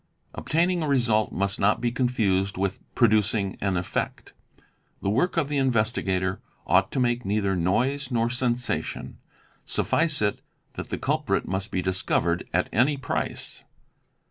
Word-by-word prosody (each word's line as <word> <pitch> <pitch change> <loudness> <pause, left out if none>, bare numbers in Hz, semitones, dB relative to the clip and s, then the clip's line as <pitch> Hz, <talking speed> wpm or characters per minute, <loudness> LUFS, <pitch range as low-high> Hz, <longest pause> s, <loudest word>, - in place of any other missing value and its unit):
"Obtaining 170 +2 +1
a 155 - -1
result' 120 -6 +2
must 100 +1 -1
not 100 +2 +3
be 120 0 0
confused 105 -7 0
with 95 0 -1 0.2
'producing 110 -3 +2
an 95 -2 0
effect." 85 - -3 0.7
The 100 - +1
work 150 - +1
of 160 -4 +2
the 145 -1 0
investigator 105 -7 0 0.2
ought 95 +3 +3
to 135 - 0
make 120 -1 +1
neither 100 -1 0
noise 125 +10 0
nor 120 -2 +1
sensation: 125 -1 -2 0.4
suffice 160 -3 +1
it 105 -1 0 0.3
that - - -7
the - - -2
culprit - - 0
must 95 +3 -3
be 90 - -2
discovered 90 -2 0
at - - +1
any 135 +6 +3
price. 135 - -4
110 Hz, 145 wpm, -25 LUFS, 95-130 Hz, 0.7 s, not